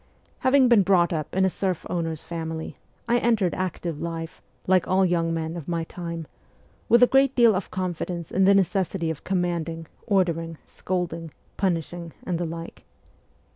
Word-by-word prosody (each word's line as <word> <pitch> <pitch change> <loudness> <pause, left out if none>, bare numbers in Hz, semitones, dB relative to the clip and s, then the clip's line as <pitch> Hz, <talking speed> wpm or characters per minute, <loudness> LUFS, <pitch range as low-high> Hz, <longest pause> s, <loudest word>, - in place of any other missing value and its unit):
Having 260 0 +5
been 235 -4 +6
brought 180 -2 +3
up 155 0 -4
in 190 0 +3
a - - +3
serf 185 -3 -2
owner's 165 -3 -3
family, 160 -1 -5 0.3
I 240 +1 +3
entered 220 -7 +2
active 175 -3 -3
life, 165 -1 -5 0.2
like 185 -1 +3
all 190 +1 +3
young 170 -2 +1
men 165 0 -2
of 165 -4 -7
my 170 -1 -1
time, 170 -1 -6 0.6
with 235 +1 +6
a - - +11
great 270 +1 +3
deal 235 -3 +6
of 185 0 -3
confidence 175 -2 -4
in 190 0 +3
the 200 +1 +6
necessity 185 -3 +1
of 155 - -8
command 175 -3 -1
ing, 165 0 -6 0.2
ordering, 165 -4 +1
scolding, 170 -3 -3 0.3
punishing, 170 -2 -2
and 175 -2 -2
the 175 - -1
like. 165 +1 -7
175 Hz, 170 wpm, -25 LUFS, 165-190 Hz, 0.6 s, a